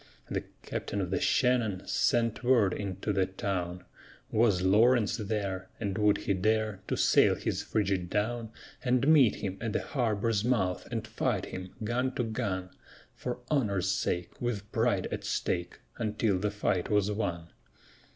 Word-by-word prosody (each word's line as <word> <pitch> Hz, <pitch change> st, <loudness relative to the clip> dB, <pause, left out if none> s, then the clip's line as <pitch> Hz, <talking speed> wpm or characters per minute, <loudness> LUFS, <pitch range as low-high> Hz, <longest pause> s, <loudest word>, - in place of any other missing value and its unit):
The -, -, -2 dB, 0.2 s
captain 100 Hz, -, -3 dB
of 90 Hz, -2 st, -2 dB
the 95 Hz, -, +1 dB
Shannon 120 Hz, -7 st, +2 dB
sent 115 Hz, 0 st, +1 dB
word 120 Hz, -7 st, +4 dB
into 100 Hz, +1 st, -3 dB
the 95 Hz, -2 st, +2 dB
town: 90 Hz, -2 st, -3 dB, 0.5 s
Was 105 Hz, -5 st, +3 dB
Lawrence 110 Hz, +4 st, +4 dB
there, 100 Hz, -3 st, -3 dB
and 100 Hz, -4 st, -2 dB
would 105 Hz, 0 st, +3 dB
he 100 Hz, -, +2 dB
dare 110 Hz, +1 st, 0 dB
to -, -, 0 dB
sail -, -, +5 dB
his -, -, -2 dB
frigate 95 Hz, -4 st, -1 dB
down 115 Hz, +3 st, -1 dB, 0.3 s
And 125 Hz, +1 st, +2 dB
meet 145 Hz, -8 st, +6 dB
him 95 Hz, -1 st, -4 dB
at 115 Hz, -2 st, -2 dB
the -, -, 0 dB
harbor's 115 Hz, -4 st, 0 dB
mouth 100 Hz, -7 st, 0 dB
and 115 Hz, -2 st, -3 dB
fight 110 Hz, -2 st, -1 dB
him, 95 Hz, 0 st, -8 dB
gun 125 Hz, +4 st, -1 dB
to 125 Hz, -, 0 dB
gun, 100 Hz, -5 st, -3 dB, 0.4 s
For 125 Hz, 0 st, -5 dB
honor's 100 Hz, -, +1 dB
sake, 90 Hz, -2 st, -2 dB
with 110 Hz, -4 st, -3 dB
pride 110 Hz, -5 st, +1 dB
at -, -, -3 dB
stake, 85 Hz, 0 st, -2 dB, 0.2 s
until 110 Hz, -3 st, 0 dB
the 105 Hz, +2 st, 0 dB
fight 100 Hz, -3 st, -1 dB
was 105 Hz, -1 st, +2 dB
won? 85 Hz, -5 st, -3 dB
105 Hz, 155 wpm, -30 LUFS, 95-115 Hz, 0.5 s, meet